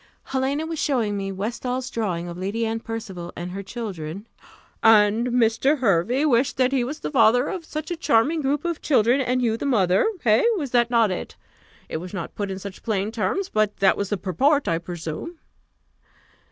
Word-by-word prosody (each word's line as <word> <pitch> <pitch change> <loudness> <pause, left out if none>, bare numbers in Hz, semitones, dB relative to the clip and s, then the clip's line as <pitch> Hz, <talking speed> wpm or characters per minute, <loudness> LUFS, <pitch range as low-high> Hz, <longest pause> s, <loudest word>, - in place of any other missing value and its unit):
"Helena 270 +3 -1
was 325 -1 -4
showing 230 -8 0
me 195 -1 -3
Westall's 245 +6 -3
drawing 180 -7 -2
of 170 - -6
Lady 200 +6 -2
Anne 225 0 -2
Percival 205 -7 -6
and 175 +1 -5
her 195 +2 -5
children 195 -4 -6 0.3
" - - -29 0.2
"And 220 +1 +5
Mr. 245 +4 +2
Hervey 240 - +2
wished 255 -2 +2
that 255 0 +3
he 265 -3 +1
was 285 +5 -5
the - - -4
father 245 0 +4
of 360 -4 -5
such 310 +2 -5
a - - 0
charming 310 +1 +2
group 290 +3 -1
of 340 -2 -2
children, 255 -2 +3
and 255 0 0
you 225 -2 +1
the 280 - -3
mother 195 - +3
hey? - - +4
was 280 -8 -4
not 240 -1 +3
that 230 -4 +3
it? 180 - -5 0.5
It - - -4
was 180 +4 -7
not 170 -3 -5
put 205 -1 -3
in 190 - -4
such 195 0 -8
plain 210 -2 -1
terms, 360 - -1
but 215 -1 0
that 195 -1 +4
was 200 -1 -3
the 205 - 0
purport, 270 - +1
I 165 -1 +1
presume?" 170 - -6
225 Hz, 195 wpm, -23 LUFS, 195-265 Hz, 0.5 s, And